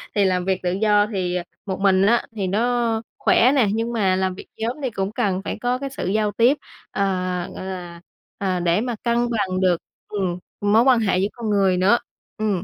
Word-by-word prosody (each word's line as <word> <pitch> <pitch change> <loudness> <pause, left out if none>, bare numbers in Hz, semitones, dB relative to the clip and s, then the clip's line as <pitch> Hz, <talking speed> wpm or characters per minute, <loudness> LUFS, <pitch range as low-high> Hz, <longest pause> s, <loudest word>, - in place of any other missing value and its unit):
Thì 205 - +3
làm 180 -1 +1
việc 190 -1 0
tự 180 - +1
do 205 +1 +3
thì, 185 -4 -2
à, 175 - -1 0.2
một 190 -1 -3
mình 190 -1 +4
á 235 +3 +3
thì 195 -3 -2
nó 230 +2 +1 0.2
khỏe 250 +3 +4
nè, 245 -7 +4
nhưng 230 +2 -1
mà 195 -5 +2
làm 185 -1 -1
việc - - -11
nhóm 230 +4 -2
thì 260 - 0
cũng 195 -1 -2
cần 200 -5 -1
phải - - -4
có 245 +1 +1
cái 275 +1 -5
sự 270 - -5
giao 210 +1 +1
tiếp, 245 +8 +3 0.3
à, 185 -2 -1
gọi 185 - -6
là, 175 -2 -7 0.4
à, 185 -2 -1
để 175 +3 +2
mà 245 -2 -2
cân 235 0 +1
bằng 190 -4 -1
được, 180 -2 +3 0.3
ừm, 185 -4 -2 0.2
mối 205 +3 +4
quan 255 -2 +5
hệ 200 -4 +1
giữa 195 - +2
con 230 -3 -4
người 195 -3 +3
nữa. 195 +6 +4 0.4
Ừm, 205 -5 -1
200 Hz, 220 wpm, -22 LUFS, 185-230 Hz, 0.4 s, quan